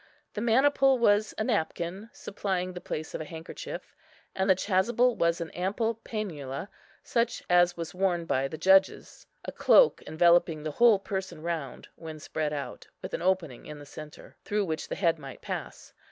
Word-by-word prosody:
The 210 - -4
maniple 270 +3 +4
was 215 -2 +2
a - - 0
napkin, 195 -1 -2
supplying 185 -2 -3
the 180 - -7
place 155 +1 -5
of - - -4
a - - -5
handkerchief; 160 +1 -8 0.4
and 190 +1 0
the 190 - +7
chasuble 220 +6 +2
was 170 0 +1
an 165 -1 -5
ample 205 +6 -1
pænula, 165 - -5 0.3
such 235 -1 -1
as 175 0 +4
was 165 -1 -5
worn 180 -2 0
by 135 -4 0
the 155 - -7
judges, 190 +4 +2 0.2
a - - -4
cloak - - +5
enveloping 165 -1 +3
the 155 - -3
whole 230 +5 +5
person 190 -4 -5
round, 160 -6 -4
when 160 -2 -8
spread 155 0 -3
out, 145 -2 -6 0.2
with - - -6
an - - -2
opening 175 -8 -1
in 150 - -8
the 145 - -11
centre, 150 +1 -11
through 210 -1 0
which 160 -3 -3
the - - -4
head 165 -4 +1
might 135 -3 -10
pass. - - -6
180 Hz, 175 wpm, -28 LUFS, 160-205 Hz, 0.4 s, the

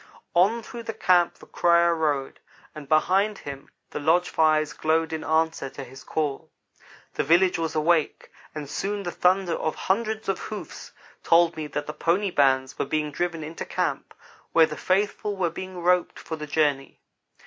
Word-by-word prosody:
On 205 +7 +3
through 235 - -8
the 225 -1 -6
camp 175 -1 +3
the - - -16
crier 170 0 +3
rode, 150 -4 -1 0.3
and 145 -2 -10
behind 195 +6 +2
him 140 -1 -9 0.2
the - - -4
lodge 170 +4 +2
fires 155 -1 +2
glowed 160 +1 0
in 160 - -3
answer 160 -3 0
to 140 - -8
his 130 +1 -12
call. 150 -3 -3 0.6
The - - -1
village 175 +4 +3
was 160 -1 -2
awake, 155 0 +1 0.2
and 150 -2 -5
soon 200 +7 -3
the 175 - -3
thunder 180 0 +2
of 160 - -2
hundreds 220 +2 -1
of 195 - -1
hoofs 215 - -8 0.3
told 170 0 +4
me 155 -1 -5
that 145 0 -4
the 150 - -6
pony 185 +5 0
bands 130 -3 +2
were - - +1
being 150 -1 -1
driven 165 +1 -2
into 160 +2 -6
camp, - - -3 0.4
where 165 -1 +7
the 155 -1 -6
faithful 205 +3 -1
were 175 -3 0
being 185 +2 -7
roped 180 0 +1
for 160 - -6
the 150 -1 -7
journey. 145 -3 0
165 Hz, 175 wpm, -25 LUFS, 150-185 Hz, 0.6 s, where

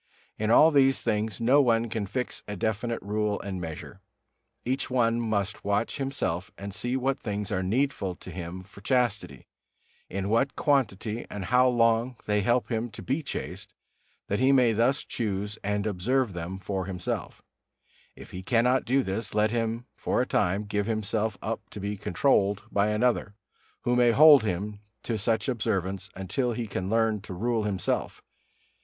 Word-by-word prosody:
In 110 0 0
all 155 +7 +7
these 135 -2 +4
things 105 -2 -1
no 130 +5 +5
one 115 -3 +2
can 110 -2 -3
fix 125 +5 -3
a 105 - -4
definite 110 +4 -1
rule 105 0 -1
and 95 -2 -5
measure. 80 -2 -7 0.6
Each 130 +2 -1
one 120 -2 +2
must 105 -3 -1
watch 100 +3 0
himself 135 -10 -2
and 100 0 -6
see 120 +5 -2
what 130 +1 0
things 105 -1 -4
are 95 - 0
needful 100 -2 0
to 90 - -11
him 90 +1 -6
for 100 +1 -15
chastity, 120 -2 0 0.6
in 100 +1 -3
what 115 +6 +1
quantity 115 -6 0
and 100 -2 -5
how 125 +3 +4
long 120 0 +2
they 105 0 +2
help 120 +4 +1
him 115 +1 -1
to 110 - -10
be 135 +5 -1
chaste, 145 - -6 0.5
that 100 - -1
he 130 +2 +4
may 125 -4 +5
thus 120 +6 +2
choose 105 -1 -3
and 105 0 -1
observe 110 +4 0
them 85 +2 -5
for 95 -1 -3
himself; 90 -2 -4 0.7
if - - -12
he 90 - -6
cannot 120 +6 +2
do 135 +2 +2
this, 100 0 -3
let 105 0 +3
him 115 0 -1
for - - -1
a - - +2
time 95 +4 +1
give 105 0 -2
himself 110 -1 -1
up 115 0 -2
to - - -8
be 100 +1 -3
controlled 100 0 +1
by 100 +1 +2
another, 105 -1 +1 0.5
who 120 - +1
may 120 -1 +5
hold 145 +4 +8
him 105 0 -3 0.2
to 115 - -2
such 110 0 0
observance 95 -6 -1
until 120 +7 -1
he 115 +1 -3
can 95 -2 -4
learn 110 -1 +2
to 95 -2 -8
rule 115 +2 0
himself. 95 -4 -2
110 Hz, 170 wpm, -27 LUFS, 100-120 Hz, 0.7 s, hold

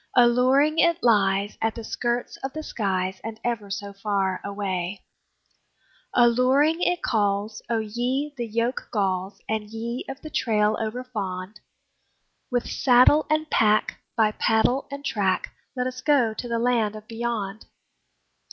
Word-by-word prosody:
Alluring 255 +6 +4
it 340 0 +3
lies 200 -3 +2
at 225 0 0
the 230 - -6
skirts 240 +2 -2
of 270 0 -5
the 310 0 -5
skies, 190 -6 -2
And 225 0 -6
ever 230 -4 -2
so 200 0 -5
far 195 -2 -1
away; 195 -2 -3 1.1
Alluring 255 +7 +4
it 355 -1 +1
calls: 205 0 0
O 230 - +1
ye 245 +7 -2
the 240 -3 -4
yoke 230 +3 -1
galls, 195 -2 -1
And 215 -1 -2
ye 230 +3 -4
of 270 0 -6
the 310 - -8
trail 215 -4 +2
overfond, 215 -4 -4 0.9
With 245 -1 -1
saddle 255 +4 +5
and 310 0 +1
pack, 215 -1 +2
by 220 -2 +3
paddle 225 +5 +1
and 280 0 -7
track, 195 -7 0 0.2
Let's 255 0 -3
go 255 -5 +3
to 240 - -6
the 235 -1 -1
Land 230 -3 +1
of 215 0 -10
Beyond! 225 -3 -4
225 Hz, 140 wpm, -25 LUFS, 205-250 Hz, 1.1 s, saddle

